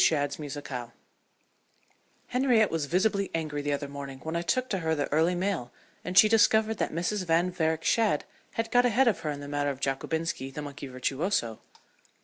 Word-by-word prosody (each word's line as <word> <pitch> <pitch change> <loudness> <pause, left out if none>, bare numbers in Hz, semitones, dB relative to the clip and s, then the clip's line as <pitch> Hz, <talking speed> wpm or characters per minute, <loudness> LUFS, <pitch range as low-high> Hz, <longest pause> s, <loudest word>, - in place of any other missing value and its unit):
SHADD'S 145 -2 +1
MUSICALE 135 -5 -6 1.4
Henriette 250 -4 +3
was 160 -3 -1
visibly 200 +4 +1
angry 155 -3 -2
the 145 0 -2
other 145 0 -2
morning 140 -1 -7
when 160 +1 -4
I 170 - 0
took 255 +9 0
to 190 - 0
her 160 -1 0
the 145 -2 -1
early 165 +4 +3
mail 175 -9 -2 0.3
and 180 +1 -3
she 215 - +9
discovered 220 0 +3
that - - 0
Mrs. 180 +4 -1
Van 170 +2 +2
Varick 160 -2 0
Shadd 215 -10 +2 0.3
had 225 0 -2
got 245 0 +5
ahead 245 +3 +3
of 220 - +2
her 160 -2 -3
in 145 -1 -4
the 145 - -7
matter 145 0 -1
of 135 -2 -4
Jockobinski, 135 0 -2
the 150 +2 -6
monkey 140 -1 -7
virtuoso. 130 - -1
160 Hz, 185 wpm, -28 LUFS, 145-200 Hz, 1.4 s, she